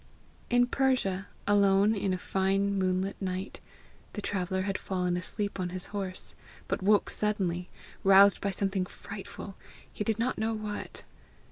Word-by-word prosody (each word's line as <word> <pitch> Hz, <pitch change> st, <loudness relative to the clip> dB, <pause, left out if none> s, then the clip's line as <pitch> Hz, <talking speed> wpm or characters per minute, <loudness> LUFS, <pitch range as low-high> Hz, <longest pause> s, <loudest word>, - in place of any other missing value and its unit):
In 245 Hz, 0 st, +5 dB
Persia, 245 Hz, -8 st, +1 dB, 0.2 s
alone 200 Hz, +1 st, +4 dB
in 200 Hz, -2 st, 0 dB
a 185 Hz, -, 0 dB
fine 195 Hz, +2 st, +1 dB
moonlit 190 Hz, 0 st, 0 dB
night, 185 Hz, +1 st, -3 dB, 0.5 s
the 210 Hz, -, -4 dB
traveller 190 Hz, -1 st, -1 dB
had 195 Hz, 0 st, -2 dB
fallen 180 Hz, -2 st, -1 dB
asleep 200 Hz, +3 st, -3 dB
on 180 Hz, -1 st, -1 dB
his 185 Hz, 0 st, -3 dB
horse, 190 Hz, -2 st, -1 dB, 0.3 s
but -, -, -1 dB
woke 205 Hz, +2 st, +4 dB
suddenly, 185 Hz, -4 st, -1 dB, 0.3 s
roused 195 Hz, 0 st, +7 dB
by 200 Hz, -, 0 dB
something 195 Hz, -1 st, -1 dB
frightful, 200 Hz, 0 st, -8 dB, 0.4 s
he -, -, -2 dB
did 220 Hz, 0 st, 0 dB
not 235 Hz, +3 st, -1 dB
know 220 Hz, +1 st, 0 dB
what. 210 Hz, -1 st, -4 dB
195 Hz, 145 wpm, -30 LUFS, 185-205 Hz, 0.5 s, roused